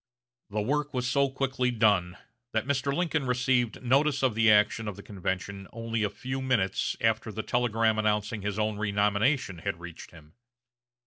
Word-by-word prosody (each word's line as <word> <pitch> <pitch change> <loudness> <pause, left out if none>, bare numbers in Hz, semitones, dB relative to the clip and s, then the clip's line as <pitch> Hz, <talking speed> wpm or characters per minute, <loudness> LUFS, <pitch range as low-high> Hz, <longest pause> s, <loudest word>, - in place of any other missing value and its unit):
The 105 +1 -1
work 145 +4 -1
was 125 0 0
so 140 +2 +2
quickly 130 -1 -1
done 100 -7 +2 0.4
that 110 0 0
Mr. 140 0 0
Lincoln 160 -3 0
received 125 -1 +1
notice 140 +4 +2
of 130 -3 +3
the 110 0 +4
action 105 +1 +4
of 105 - -4
the 100 - -11
convention 95 0 -4
only 115 -1 -3
a 105 - +1
few 130 +4 -5
minutes 115 -8 0
after 115 0 +1
the 110 +1 -4
telegram 115 -2 +1
announcing 105 0 0
his 100 0 -3
own 105 -1 -1
renomination 105 - +1
had 85 - -3
reached 85 -1 -10
him. 80 -2 -17
110 Hz, 170 wpm, -28 LUFS, 105-130 Hz, 0.4 s, the